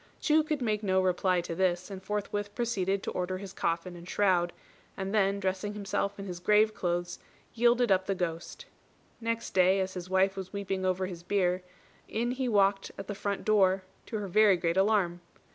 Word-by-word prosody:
Chu 310 0 +4
could 305 -3 -2
make 215 -2 0
no 190 -3 +2
reply 185 -1 +2
to 170 - -5
this, 180 +1 0
and 190 -1 -6
forthwith 205 +1 -3
proceeded 200 -5 -1
to - - -3
order 185 +1 -2
his 195 0 -8
coffin 170 0 -2
and 175 +1 -11
shroud; 180 -4 +2 0.5
and 195 +1 -3
then, 200 -1 +2
dressing 190 +2 -2
himself 200 0 -2
in 195 - -6
his 180 -2 -6
grave 210 +4 +4
clothes, 175 -1 -2 0.3
yielded 240 -1 +3
up 190 0 +3
the 195 - 0
ghost. 170 -2 -4 0.5
Next 230 0 -3
day, 185 +1 +4
as 190 0 -2
his 180 -1 -7
wife 190 +1 +3
was 190 -1 -6
weeping 195 -2 -2
over 185 0 0
his 180 -2 -7
bier, 180 0 +1 0.5
in 235 +2 -1
he 255 0 -1
walked 195 -2 +2
at 195 - -6
the 205 - -4
front 200 0 -3
door, 195 -3 +3 0.2
to 220 - -3
her 205 -1 -4
very 200 0 +5
great 170 -1 0
alarm. 190 -3 +2
195 Hz, 195 wpm, -29 LUFS, 185-210 Hz, 0.5 s, very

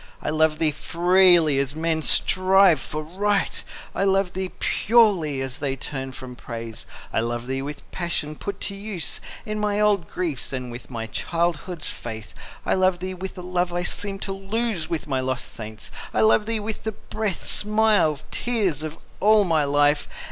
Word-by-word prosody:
I - - -2
love 155 0 +2
thee 155 -1 +3
freely, 175 -2 +4
as 140 +1 -1
men 160 0 0
strive 185 0 +4
for 155 +3 -4
Right; 200 +5 0 0.3
I - - 0
love 195 -1 +2
thee 190 0 -3
purely, 195 - +3
as 130 -1 -3
they 140 -2 -1
turn 135 0 -5
from 125 0 -9
Praise. 115 -2 -7 0.3
I - - +2
love 120 +1 -2
thee 135 +1 -2
with 145 +1 -5
the - - -18
passion 170 -4 -2
put 200 +4 -5
to 200 - -4
use 195 -3 -4 0.3
In 215 0 -3
my 210 -1 0
old 205 -5 +2
griefs, 160 -8 -3
and 125 -2 -4
with 120 0 -9
my 115 -3 -4
childhood's 170 - -2
faith. 110 -2 -7 0.3
I - - +2
love 185 -1 +3
thee 185 +1 -4
with 190 +1 -7
a - - -5
love 180 0 0
I 175 0 0
seemed 195 +2 -2
to 195 - -3
lose 195 -2 -2
With 160 -2 -2
my 135 -2 0
lost 130 -1 -3
saints,—I 110 -1 -5
love 220 -1 +4
thee 225 -1 0
with 215 +1 -4
the 220 - -2
breath, 210 -2 -3
Smiles, 210 -8 +2
tears, 205 - +1
of 155 0 -5 0.2
all 215 +1 +5
my 160 -5 +2
life! 145 +1 +3
170 Hz, 180 wpm, -24 LUFS, 140-195 Hz, 0.3 s, all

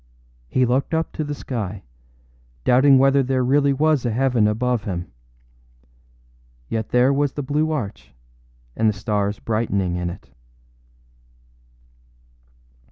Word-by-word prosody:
He 130 - +1
looked 130 +6 0
up 160 0 -1
to 155 - -4
the 145 0 -4
sky, 105 -8 -5 0.8
doubting 135 +2 +5
whether 135 +1 +4
there 130 0 0
really 140 +2 +3
was 150 0 +2
a 120 - 0
heaven 120 -2 +2
above 115 +1 -1
him. 90 -4 -5 1.6
Yet 110 -1 -3
there 125 +3 +3
was 140 0 0
the 145 - -4
blue 150 +3 0
arch, 100 - -5 0.6
and 110 - +2
the - - 0
stars 105 0 -1
brightening 100 -5 -1
in 90 0 -2
it. 85 - -11
125 Hz, 125 wpm, -22 LUFS, 105-140 Hz, 1.6 s, doubting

